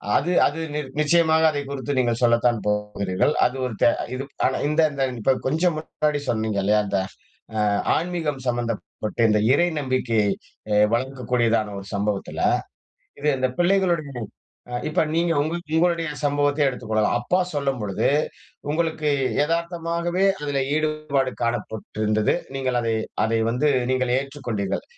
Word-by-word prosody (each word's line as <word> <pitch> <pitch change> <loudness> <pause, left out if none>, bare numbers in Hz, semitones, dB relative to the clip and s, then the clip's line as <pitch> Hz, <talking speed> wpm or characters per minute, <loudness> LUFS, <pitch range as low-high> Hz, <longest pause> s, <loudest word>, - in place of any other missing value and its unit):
அது 170 +6 +2
அது 150 +3 -1
நிர் 150 -2 -3
நிச்சயமாக 160 +1 +4
அதை 145 -1 -2
குறித்து 140 0 -3
நீங்கள் 120 -2 +1
சொல்லத்தான் 120 -1 +3
போகிறீர்கள். 105 +2 0
அது 125 - 0
ஒரு 125 - -3
த - - +6 0.3
இது 130 +1 -3
ப் - - -35
ஆனா 130 - +1
இந்த 150 +2 +2
இந்த 140 -1 -1 0.2
இப்ப 135 +5 +3
கொஞ்சம் 160 +4 +1
முன்னாடி 150 -1 -1
சொன்னீங்க 110 -3 0
இல்லையா, 105 +2 +3
அந்த 100 0 -1 0.6
அ - - 0 0.4
ஆன்மீகம் 165 -5 -2
சம்மந்தப்பட்ட 115 -3 -3
இந்த 105 0 +3
இறை 175 +5 +3
நம்பிக்கையை 125 -6 +1 0.4
எ 105 - +4 0.2
வளர்கக்கூடியதான 120 -4 0
ஒரு 100 - -11
சம்பவத்தில, 100 0 -2 0.8
இது 150 - 0
இந்த 130 0 +1
பிள்ளைகளுடைய 175 -5 +2 0.6
அ - - -8 0.2
இப்ப 155 - +2
நீங்க 170 +1 +2
உங்க 155 +3 -2 0.2
உங்களுடைய 170 0 +2 0.2
சம்பவத்தையே 145 0 +2
எடுத்துக்கொள்ளலாம். 110 -4 0
அப்பா 180 +9 +1 0.2
சொல்லும் 140 -2 0
பொழுது, 100 -2 0 0.6
உங்களுக்கு 160 -1 0 0.4
எதார்த்தமாகவே 170 +2 -1 0.2
அதில 145 -1 -1 0.2
ஈடுபாடு 155 -3 0
காணப்பட்டிருந்தது. 110 -2 -1 0.2
நீங்கள் 130 -2 0
அதை 115 -1 0 0.3
அதை 115 +1 +1
வந்து 130 +6 +1 0.2
நீங்கள் 130 -1 +1
ஏற்றுக்கொண்டீர்கள். 130 -8 -3
135 Hz, 135 wpm, -23 LUFS, 115-155 Hz, 0.8 s, த